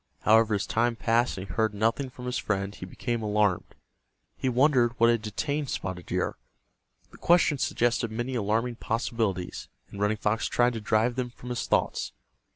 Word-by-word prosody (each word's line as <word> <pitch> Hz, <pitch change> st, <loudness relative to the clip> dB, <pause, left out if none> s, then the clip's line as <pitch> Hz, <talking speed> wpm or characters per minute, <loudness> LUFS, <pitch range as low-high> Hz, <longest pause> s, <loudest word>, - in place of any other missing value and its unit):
However, 110 Hz, 0 st, +4 dB
as 100 Hz, -, -1 dB
time 120 Hz, +1 st, +1 dB
passed 115 Hz, +1 st, +1 dB
and 95 Hz, -, -5 dB
he 90 Hz, -, -7 dB
heard 110 Hz, +1 st, +1 dB
nothing 115 Hz, +6 st, 0 dB
from 125 Hz, 0 st, -10 dB
his 125 Hz, -, -1 dB
friend 100 Hz, -1 st, -2 dB
he 90 Hz, -, -8 dB
became 120 Hz, +4 st, -3 dB
alarmed. 105 Hz, -3 st, 0 dB, 0.6 s
He 130 Hz, -, -1 dB
wondered 125 Hz, -2 st, +3 dB
what 115 Hz, +1 st, +6 dB
had 115 Hz, -2 st, +1 dB
detained 140 Hz, +7 st, -2 dB
Spotted 95 Hz, -, -4 dB
Deer. -, -, -1 dB, 0.7 s
The -, -, -14 dB
question 165 Hz, -4 st, +3 dB
suggested 120 Hz, -2 st, +1 dB
many 120 Hz, +4 st, -3 dB
alarming 115 Hz, +1 st, 0 dB
possibilities, 110 Hz, -6 st, -2 dB, 0.2 s
and 100 Hz, -, -8 dB
Running 105 Hz, +1 st, +1 dB
Fox 110 Hz, +1 st, 0 dB
tried 120 Hz, 0 st, +2 dB
to 115 Hz, -, -5 dB
drive 110 Hz, +3 st, +1 dB
them 125 Hz, -1 st, -1 dB
from 125 Hz, +1 st, -11 dB
his 120 Hz, -, -3 dB
thoughts. -, -, 0 dB
115 Hz, 175 wpm, -27 LUFS, 105-125 Hz, 0.7 s, what